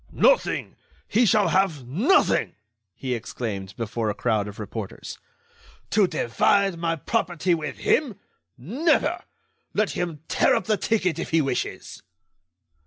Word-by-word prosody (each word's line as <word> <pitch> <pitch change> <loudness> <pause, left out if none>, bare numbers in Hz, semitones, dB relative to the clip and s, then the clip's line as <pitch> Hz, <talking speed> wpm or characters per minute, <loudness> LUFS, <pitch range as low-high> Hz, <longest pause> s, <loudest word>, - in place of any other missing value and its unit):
"Nothing! - - +2 0.3
He 235 +2 +3
shall 205 +1 +3
have 175 -9 +1
nothing!" 225 - +2 0.4
he 130 -2 -3
exclaimed, 105 -4 -5
before 115 -1 -2
a 105 - -2
crowd 110 -4 0
of 105 - -9
reporters. 105 -1 -7 0.7
"To 205 -2 +4
divide 180 - +1
my 165 -1 0
property 175 0 0
with 155 -3 -3
him? 270 -9 +1 0.4
Never! 255 - +1 0.6
Let 210 0 +1
him 165 -4 -4
tear - - +3
up - - -1
the 215 - +2
ticket 185 -8 0
if - - -4
he 165 - +3
wishes!" 135 -4 -3
165 Hz, 130 wpm, -24 LUFS, -, 0.7 s, To